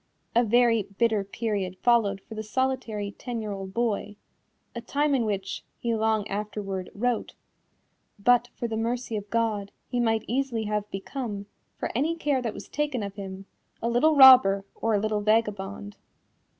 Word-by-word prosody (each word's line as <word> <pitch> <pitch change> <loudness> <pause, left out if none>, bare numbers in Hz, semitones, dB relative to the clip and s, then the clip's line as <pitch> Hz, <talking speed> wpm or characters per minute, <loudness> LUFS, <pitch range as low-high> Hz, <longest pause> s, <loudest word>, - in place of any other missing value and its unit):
A 235 - +5
very 235 0 +4 0.2
bitter 225 -4 +2
period 200 -3 -3
followed 215 -5 +3
for - - -11
the 215 - -4
solitary 220 -3 -2
ten 240 +3 -5
year 215 -2 -4
old 195 -1 -6
boy 210 -2 -1 0.6
a 235 - -5
time 285 +4 0
in 250 -4 +2
which, 195 -2 -3
he 235 -1 -1
long 220 -1 +1
afterward 200 -2 -4
wrote, 240 +2 -1 0.8
"but 245 +3 +3
for 235 - -3
the 225 - -3
mercy 235 +1 -2
of 205 -1 -5
God, 215 -3 0 0.2
he 245 - -1
might 225 -2 +1
easily 245 -1 -1
have 210 -1 -2
become, 205 0 -5 0.3
for - - -3
any 300 +8 +1
care 290 -5 0
that 230 -3 -3
was - - -9
taken 290 -6 -2
of 200 -1 -5
him, 195 -1 -8 0.3
a 230 - -2
little 305 +7 +4
robber 255 -8 +8
or 225 -1 0
a - - +2
little 215 0 0
vagabond." 205 -2 0
220 Hz, 165 wpm, -27 LUFS, 205-240 Hz, 0.8 s, robber